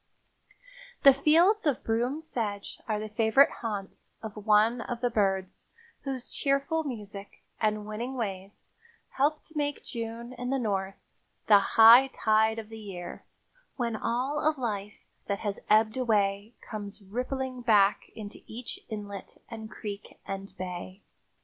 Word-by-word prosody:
The 275 - +10
fields 335 +8 +4
of 280 -4 0
broom 240 +7 0
sedge 220 -10 -4
are 215 -2 0
the 215 - -4
favorite 225 +5 +4
haunts 205 -4 -5
of 220 -2 -6
one 215 +3 +4
of 240 0 -4
the 245 0 0
birds 195 -3 0 0.4
whose 265 -3 -4
cheerful 280 +4 0
music 210 -7 -7 0.2
and 215 -1 0
winning 230 +5 -4
ways 195 -4 -5 0.4
help 295 +3 +1
to 315 - -14
make 290 -1 -2
June 235 0 -5
in 250 0 -5
the 270 - +1
North 195 -5 -1 0.5
"the 205 -2 +8
high 230 +6 +8
tide 220 -3 +2
of 220 -1 -6
the 225 0 -9
year, 180 -4 -8 0.5
when 235 -3 -1
all 250 +7 -1
of 310 0 +1
life 210 -5 -4 0.2
that 200 -1 -2
has 205 -2 -2
ebbed 215 +1 +4
away 210 -2 +1
comes 205 -1 -7
rippling 255 +4 -3
back 210 -4 +3
into 210 -2 -8
each 235 +2 -7
inlet 205 -2 -7
and 220 -1 -7
creek 205 -1 -8
and 195 0 -6
bay." 185 +1 -6
220 Hz, 145 wpm, -29 LUFS, 205-255 Hz, 0.5 s, The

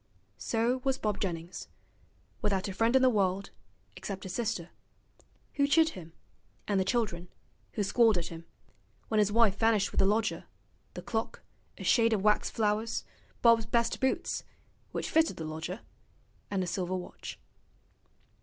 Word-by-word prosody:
So 240 +3 0
was 270 -1 +1
Bob 210 -5 -1
Jennings: 170 -2 -4 0.7
without 195 -1 0
a 195 - -4
friend 225 +5 +2
in 260 - +5
the - - +7
world, 195 -2 0 0.4
except 195 -2 -6
his 185 - -6
sister, 215 -7 -2 0.8
who 280 -1 +2
chid 320 +3 +5
him, 165 - -10 0.5
and 200 -2 +2
the - - +3
children, 190 -6 -1 0.5
who 210 - 0
squalled 225 0 +4
at 170 - -3
him: 165 0 -9 0.6
when 220 - +2
his 210 -1 +3
wife 220 -3 +4
vanished 225 -3 +3
with - - -1
the 195 - +5
lodger, 220 +2 0 0.5
the - - -6
clock, 225 -1 -3 0.3
a - - -7
shade 230 -1 +4
of 200 -3 0
wax 210 0 +3
flowers, 215 0 0 0.4
Bob's 230 -2 +5
best 235 0 +1
boots 265 - 0 0.5
(which - - -3
fitted 320 0 +3
the 160 - -4
lodger), 160 +6 -5 0.7
and 195 -2 0
his 175 - -3
silver 185 -1 -1
watch. 180 - -7
210 Hz, 155 wpm, -30 LUFS, 185-230 Hz, 0.8 s, the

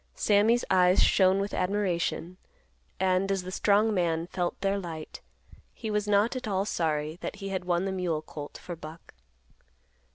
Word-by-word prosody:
Sammy's 220 +3 +3
eyes 180 0 +5
shone 190 0 +4
with 200 +1 -3
admiration, 180 -2 -1 0.6
and, 190 +1 +2
as 195 -2 -1
the 185 - -6
strong 210 +3 +3
man 170 -3 0
felt 175 0 -3
their 195 0 +1
light, 165 -4 -7 0.5
he 220 -2 -5
was 210 0 0
not 210 +4 +3
at 255 -2 -4
all 195 -1 0
sorry 155 -4 -1
that - - -4
he 195 -1 -6
had 190 -2 -3
won 175 +1 +1
the 195 - -1
mule 175 -5 -2
colt 145 -2 -8
for 175 - -7
Buck. 160 +1 -11
185 Hz, 165 wpm, -28 LUFS, 170-200 Hz, 0.6 s, eyes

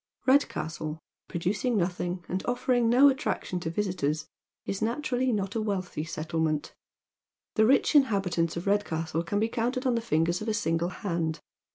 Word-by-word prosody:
Redcastle, 160 - +1 0.3
producing 195 +7 0
nothing, 175 -1 -2
and 185 +1 -2
offering 245 -1 +2
no 255 +4 +7
attraction 265 -9 0
to 165 - -3
visitors, 165 -5 -1 0.4
is 195 - -3
naturally 250 +2 0
not 205 -2 -2
a - - +1
wealtliy 185 -7 -3
settlement. 155 -1 -1 0.8
The 220 0 +4
rich 270 +5 +4
inhabi 205 - +3
tants 165 -1 0
of 170 - -4
Redcastle 165 -5 0
can 205 +4 -1
be 220 - +2
counted 245 +3 -1
on 255 - +3
the 230 - 0
fingers 170 -3 +1
of 215 - -5
a 220 - +1
single 165 -4 0
hand. 170 -4 -2
190 Hz, 160 wpm, -28 LUFS, 165-230 Hz, 0.8 s, no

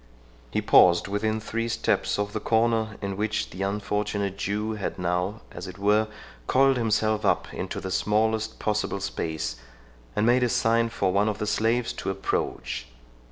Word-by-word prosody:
He - - -1
paused 85 +1 +6
within 110 +2 0
three 115 +1 -3
steps 115 - 0
of 105 0 -2
the 110 - -1
corner 110 0 +1
in 100 -1 -3
which 105 +1 -1
the 90 - -7
unfortunate 100 0 -1
Jew 105 +2 -2
had 105 -2 -4
now, 90 +4 -1
as 90 +2 -7
it 90 0 -9
were, 105 +2 +3 0.4
coiled 135 +1 +4
himself 110 -1 +1
up 100 - +1
into - - -4
the 95 - -5
smallest 110 +3 +1
possible 105 -2 -1
space, 80 -9 -3 0.6
and 105 - +2
made 120 +2 +4
a 125 - +2
sign 115 +1 +2
for 95 -5 0
one 105 +2 +3
of 105 - -2
the 105 - -2
slaves 115 +3 +1
to - - -4
approach. 80 -9 -2
105 Hz, 165 wpm, -26 LUFS, 100-110 Hz, 0.6 s, paused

